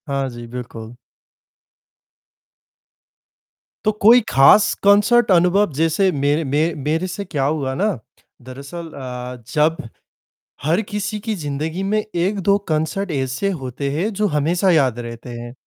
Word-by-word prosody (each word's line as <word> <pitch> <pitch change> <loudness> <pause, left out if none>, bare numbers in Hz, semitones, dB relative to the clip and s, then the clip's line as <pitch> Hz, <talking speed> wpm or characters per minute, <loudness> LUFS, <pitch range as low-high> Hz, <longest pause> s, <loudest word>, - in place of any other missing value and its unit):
हाँ 140 -1 -1
जी, 120 -1 -9
बिल्कुल। 115 -1 -8 2.9
तो 215 - +4
कोई 230 +4 +8
खास 135 +10 +6
कॉन्सर्ट 205 +3 +4
अनुभव 180 +2 +3
जैसे 165 +6 +2
मेरे 145 +1 0
मे 140 +2 0 0.3
मेरे 165 +4 0
से 190 +3 -5
क्या 150 -7 -2
हुआ 140 -2 -1
ना, 200 +7 +1 0.5
दरअसल 140 +7 -9
अ, 125 -2 -7
जब 155 +2 +2 0.9
हर 165 +8 +2
किसी 210 0 -3
की 220 +1 -3
ज़िंदगी 155 +2 -4
में 210 +2 +1
1-2 200 +1 0
कॉन्सर्ट 160 +5 -1
ऐसे 135 +6 -1
होते 130 +2 -4
हैं 175 +10 -1
जो 210 +1 0
हमेशा 170 +6 +2
याद 130 -7 +2
रहते 115 +1 -8
हैं। 120 0 -8
160 Hz, 130 wpm, -20 LUFS, 135-195 Hz, 2.9 s, कोई